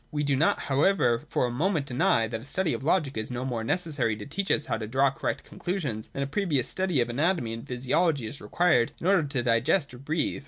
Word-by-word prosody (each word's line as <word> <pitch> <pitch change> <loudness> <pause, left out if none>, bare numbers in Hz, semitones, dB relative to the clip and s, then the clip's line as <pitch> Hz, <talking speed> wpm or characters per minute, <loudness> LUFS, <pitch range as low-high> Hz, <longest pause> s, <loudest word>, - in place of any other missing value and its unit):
We 150 0 -1
do 145 -1 +1
not, 150 +5 +2
however, 140 -4 +2
for - - +1
a 120 - -2
moment 155 +3 0
deny 125 -4 +2
that 115 0 -4
a - - -12
study 175 +4 0
of - - -4
Logic 155 -3 +1
is 110 0 -2
no 125 +1 -4
more 120 -4 -2
necessary 140 -5 0
to 105 - -8
teach 195 +7 -3
us 150 - +2
how - - -1
to 110 -1 -5
draw 135 +4 +2
correct - - -3
conclusions, 145 - -4
than 140 - -4
a - - -1
previous 145 - 0
study 185 -8 0
of 120 - -1
anatomy 150 -3 0
and 115 - -7
physiology 130 +3 +1
is 110 +6 -7
required 160 -10 +2
in - - -7
order 190 -1 +4
to 135 -4 -2
digest 130 +6 +2
or 125 - -10
breathe. 150 +3 -1
140 Hz, 235 wpm, -27 LUFS, 120-165 Hz, -, order